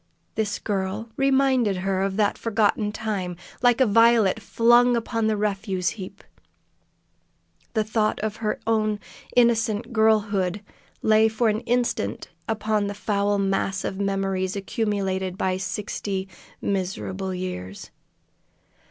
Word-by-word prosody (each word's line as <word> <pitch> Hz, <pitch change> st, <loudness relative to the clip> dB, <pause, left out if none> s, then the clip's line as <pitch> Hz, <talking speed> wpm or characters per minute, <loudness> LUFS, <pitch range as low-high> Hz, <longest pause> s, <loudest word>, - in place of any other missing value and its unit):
This 210 Hz, -2 st, -1 dB
girl 200 Hz, +2 st, -3 dB
reminded 265 Hz, -6 st, +2 dB
her 190 Hz, +1 st, -1 dB
of 195 Hz, 0 st, -1 dB
that 210 Hz, -1 st, +2 dB
forgotten 215 Hz, -1 st, +1 dB
time. 200 Hz, -5 st, -3 dB, 0.3 s
Like 245 Hz, 0 st, +4 dB
a 260 Hz, -, +6 dB
violet 230 Hz, -1 st, +4 dB
flung 240 Hz, +3 st, +4 dB
upon 225 Hz, -1 st, -1 dB
a 215 Hz, -, 0 dB
refuse 195 Hz, -3 st, -1 dB
heap, 190 Hz, -4 st, -9 dB, 1.5 s
the 220 Hz, -, +3 dB
thought 215 Hz, 0 st, 0 dB
of 215 Hz, 0 st, -3 dB
her 215 Hz, -1 st, -2 dB
own 215 Hz, -2 st, +1 dB, 0.4 s
innocent 230 Hz, -1 st, +2 dB
girlhood 210 Hz, -3 st, +2 dB, 0.4 s
lay 220 Hz, 0 st, +5 dB
for 220 Hz, +1 st, +1 dB
an 215 Hz, 0 st, 0 dB
instant 235 Hz, -, -1 dB, 0.2 s
upon 215 Hz, -1 st, 0 dB
the 205 Hz, -, -4 dB
foul 205 Hz, 0 st, 0 dB
mass 195 Hz, 0 st, 0 dB
of 190 Hz, -, -4 dB
memories 195 Hz, -1 st, -1 dB
accumulated 195 Hz, -2 st, -2 dB
by 185 Hz, -1 st, 0 dB
sixty 195 Hz, 0 st, -3 dB, 0.4 s
miserable 190 Hz, 0 st, -2 dB
years. 180 Hz, -, -6 dB
210 Hz, 120 wpm, -24 LUFS, 195-225 Hz, 1.5 s, a